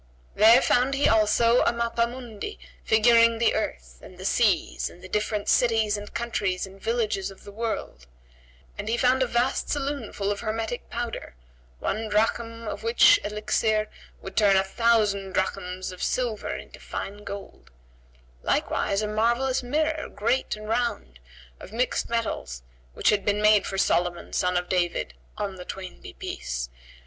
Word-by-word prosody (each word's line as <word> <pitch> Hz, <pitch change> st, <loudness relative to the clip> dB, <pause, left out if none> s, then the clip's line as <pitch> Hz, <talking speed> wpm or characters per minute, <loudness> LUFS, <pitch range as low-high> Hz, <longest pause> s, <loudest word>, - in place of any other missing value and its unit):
There 230 Hz, +4 st, +7 dB
found 255 Hz, +3 st, +2 dB
he 280 Hz, -, +3 dB
also 225 Hz, +2 st, +4 dB
a -, -, +3 dB
mappa 235 Hz, 0 st, 0 dB
mundi 245 Hz, -, -7 dB, 0.3 s
figuring 230 Hz, +1 st, +5 dB
the 230 Hz, 0 st, +3 dB
earth -, -, -4 dB
and 185 Hz, -, -13 dB
the 185 Hz, -, -8 dB
seas 210 Hz, -3 st, +1 dB
and 180 Hz, -, -16 dB
the -, -, -8 dB
different 210 Hz, +1 st, -1 dB
cities 225 Hz, -3 st, +3 dB
and 205 Hz, 0 st, -7 dB
countries 200 Hz, -6 st, -1 dB
and 190 Hz, 0 st, -14 dB
villages 220 Hz, -3 st, -1 dB
of 195 Hz, -, -14 dB
the 205 Hz, -, -10 dB
world; 205 Hz, -, -4 dB, 0.7 s
and 210 Hz, -, -3 dB
he 235 Hz, -, +1 dB
found 255 Hz, +1 st, +3 dB
a 260 Hz, -, +3 dB
vast 240 Hz, +3 st, 0 dB
saloon 280 Hz, -5 st, -2 dB
full 200 Hz, 0 st, -2 dB
of 200 Hz, -, -3 dB
hermetic 225 Hz, +2 st, -3 dB
powder, 235 Hz, -, -5 dB, 0.4 s
one 215 Hz, -, -2 dB
drachm 230 Hz, +2 st, 0 dB
of -, -, -4 dB
which 420 Hz, -3 st, +6 dB
elixir 215 Hz, 0 st, 0 dB, 0.3 s
would 195 Hz, -, -8 dB
turn 205 Hz, -3 st, +5 dB
a 190 Hz, -, +4 dB
thousand 200 Hz, -2 st, +1 dB
drachms 185 Hz, -1 st, -2 dB
of 185 Hz, -, -10 dB
silver 240 Hz, -4 st, -1 dB
into -, -, -10 dB
fine 205 Hz, +1 st, -6 dB
gold; 200 Hz, -1 st, -9 dB, 0.7 s
likewise 200 Hz, +2 st, 0 dB
a -, -, -1 dB
marvellous 235 Hz, +5 st, +1 dB
mirror, 310 Hz, +5 st, -1 dB
great 235 Hz, +4 st, 0 dB
and 215 Hz, 0 st, -9 dB
round, 225 Hz, -, -2 dB, 0.4 s
of -, -, -11 dB
mixed 245 Hz, +3 st, -1 dB
metals, 215 Hz, -, -3 dB, 0.3 s
which -, -, +2 dB
had 205 Hz, -2 st, +1 dB
been 205 Hz, 0 st, +1 dB
made 210 Hz, -1 st, +5 dB
for 195 Hz, -, -4 dB
Solomon, 175 Hz, -2 st, 0 dB
son 180 Hz, 0 st, +1 dB
of 180 Hz, 0 st, -2 dB
David 175 Hz, -, 0 dB, 0.2 s
(on 195 Hz, -2 st, -3 dB
the 180 Hz, -, -7 dB
twain 185 Hz, 0 st, -8 dB
be -, -, -10 dB
peace!) -, -, -5 dB
215 Hz, 160 wpm, -26 LUFS, 195-235 Hz, 0.7 s, There